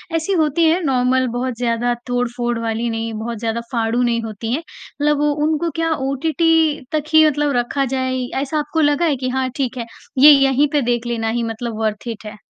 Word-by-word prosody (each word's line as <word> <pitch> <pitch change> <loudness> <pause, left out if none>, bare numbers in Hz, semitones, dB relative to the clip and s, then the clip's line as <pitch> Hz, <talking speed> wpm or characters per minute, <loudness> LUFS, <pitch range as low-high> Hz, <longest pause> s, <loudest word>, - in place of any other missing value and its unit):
ऐसी 330 +4 0
होती 305 +2 +1
हैं 345 +3 +2
नॉर्मल 260 -2 +2
बहुत 255 -1 -2
ज़्यादा 240 0 0
तोड़-फोड़ 245 -1 -1
वाली 230 +1 -2
नहीं 225 0 -3
बहुत 230 +1 -4
ज़्यादा 230 +1 -2
फाड़ू 230 0 0
नहीं 235 -1 +1
होती 225 +2 -4
हैं, 295 - 0
मतलब 295 -2 -3
वो 295 0 +2
उनको 315 +2 0
क्या 325 0 0 0.2
ओटीटी 320 +2 +2
तक 305 -2 0
ही 315 0 +7
मतलब 295 -1 0
रखा 255 +3 0
जाए? 260 0 -1 0.2
ऐसा 300 +2 -1
आपको 300 +2 -1
लगा 295 +3 +2
है 300 - +2
कि 255 0 -3
हाँ 260 0 -1
ठीक 260 -2 -2
है 235 - -3 0.3
ये 295 +3 +9
यहीं 275 +1 +4
पे 290 - +3
देख 240 0 -1
लेना 225 -2 -1
ही 235 +1 -1
मतलब 225 0 -4
वर्थ 215 +1 -2
इट 225 -2 -6
है। 210 0 -7
255 Hz, 205 wpm, -19 LUFS, 235-295 Hz, 0.3 s, ये